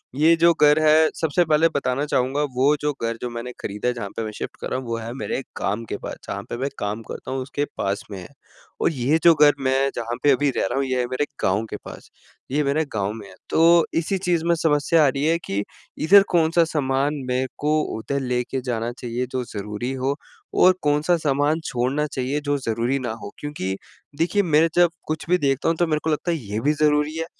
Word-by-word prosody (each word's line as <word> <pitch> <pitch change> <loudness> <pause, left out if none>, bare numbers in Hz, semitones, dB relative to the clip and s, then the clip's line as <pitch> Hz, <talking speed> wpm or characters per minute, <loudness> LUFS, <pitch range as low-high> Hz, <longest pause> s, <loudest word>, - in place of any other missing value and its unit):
ये 160 +4 +5
जो 170 +1 +5
घर 150 +1 +6
है 155 0 +5
सबसे 160 +2 +1
पहले 155 +1 +4
बताना 140 +1 0
चाहूँगा 135 0 0
वो 140 +4 +4
जो 150 - +1
घर 115 0 -2
जो 125 - -3
मैंने 120 +1 -6
ख़रीदा 105 +4 -3
है 125 - +2
जहाँ 115 -4 -5
पे 115 - -1
मैं 110 - -4
शिफ्ट - - -6
कर - - -3
रहा 130 - -1
हूँ 125 - -9
वो 115 - -2
है 115 +1 -6
मेरे 135 0 -3
काम 105 +4 -2
के - - -2
पास, - - -7
जहाँ - - -4
पे - - -4
मैं 135 +3 -2
काम 105 +2 -3
करता - - -7
हूँ 135 - -2
उसके 145 +2 -2
पास 100 +1 -2
में 95 - -6
है। 90 - -9 0.5
और - - +3
ये 140 +2 +1
जो 170 - +8
घर 150 -1 +6
मैं 135 +1 +1
जहाँ 120 0 -3
पे 145 - +6
अभी 140 +2 +2
रह - - +1
रहा 95 - -2
हूँ - - +1
ये 130 -1 -1
है 125 - +1
मेरे 130 +3 0 0.2
गाँव 95 +4 +1
के - - -5
पास, - - -10 0.4
ये 150 +2 +1
मेरे 145 +3 +1
गाँव 100 -1 -1
में 110 -2 -9
है। 95 - -14
तो 170 +1 +5
इसी 190 +4 -1
चीज़ 175 -3 0
में 170 - +3
समस्या 155 0 +3
आ - - +5
रही 135 +1 -1
है 165 +1 +3
कि 100 +1 -2 0.3
इधर 195 +5 +6
कौन-सा 165 0 +4
सामान 135 0 +1
मेरे 130 +1 0
को 155 +1 +1 0.2
उधर 140 +5 -2
लेके 125 0 -2
जाना 115 0 -1
चाहिए 120 +1 -2
जो 130 -1 -2
ज़रूरी 105 +4 -4
हो 140 +2 +1 0.5
और 185 0 +7
कौन-सा 150 +4 +2
सामान 145 +3 +2
छोड़ना 130 +5 0
चाहिए 140 +1 -2
जो 145 - +2
ज़रूरी 120 +1 -1
ना 120 -3 -3
हो - - -8
क्योंकि 120 -11 -4 0.4
देखिए, 190 +5 +2
मैं 160 -1 +4
जब 175 0 +5 0.2
कुछ 155 0 -3
भी 180 - +4
देखता 140 -1 +1
हूँ 165 - +1
तो 175 0 +2
मेरे 155 -1 +1
को 160 - -1
लगता 160 +3 0
है 165 - 0
ये 105 -5 -4
भी 150 +2 +2
ज़रूरी 150 0 +1
है, 165 - -2
140 Hz, 235 wpm, -23 LUFS, 120-155 Hz, 0.5 s, जो